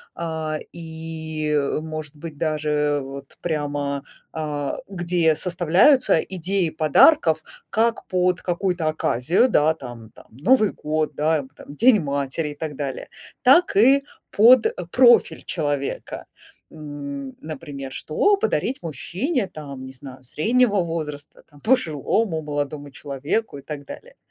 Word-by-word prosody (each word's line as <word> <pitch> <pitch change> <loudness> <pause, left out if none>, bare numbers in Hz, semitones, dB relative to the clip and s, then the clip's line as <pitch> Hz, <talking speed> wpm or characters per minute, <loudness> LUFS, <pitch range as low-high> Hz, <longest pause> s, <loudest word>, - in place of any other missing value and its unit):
а, 160 -2 -3
и, 160 -2 -5
э, 145 0 +1
может 155 -2 -6
быть, 155 -1 -9
даже 150 -2 0
вот 135 0 -10
прямо, 145 -3 -2 0.3
а, 150 -3 -3
где 175 -4 +1
составляются 180 - +4
идеи 185 -1 -1
подарков 160 - +4 0.3
как 230 +1 +1
под 180 -1 +1
какую-то 175 -2 -1
оказию, 155 - +2
да, 155 -5 +3
там 120 -6 -10
там: - - -17
Новый 215 - +3
год, 155 0 -2
да, 155 +1 +2
эм, 135 -2 -8
там, 145 0 -13
День 230 +3 +5
матери 140 +1 -2
и 145 - -8
так 155 -1 -5
далее. 135 -2 -5 0.3
Так 340 +8 +5
и 270 +6 +6 0.3
под 235 +3 +6 0.2
профиль 240 -2 +5
человека. 145 -4 -3 0.5
М, 140 -3 -7
например, 145 -3 -7
что 400 - +1
подарить 390 - -1
мужчине, 195 - -2
там, 140 -5 -9
не 130 - -10
знаю, 130 -1 -11
среднего 205 - +2
возраста, 150 -3 -6
там, 145 -1 -19
пожилому, 170 - +1
молодому 145 -1 -4
человеку 145 +7 -3
и - - -10
так 145 0 -7
далее. - - -11
155 Hz, 130 wpm, -22 LUFS, 145-180 Hz, 0.5 s, и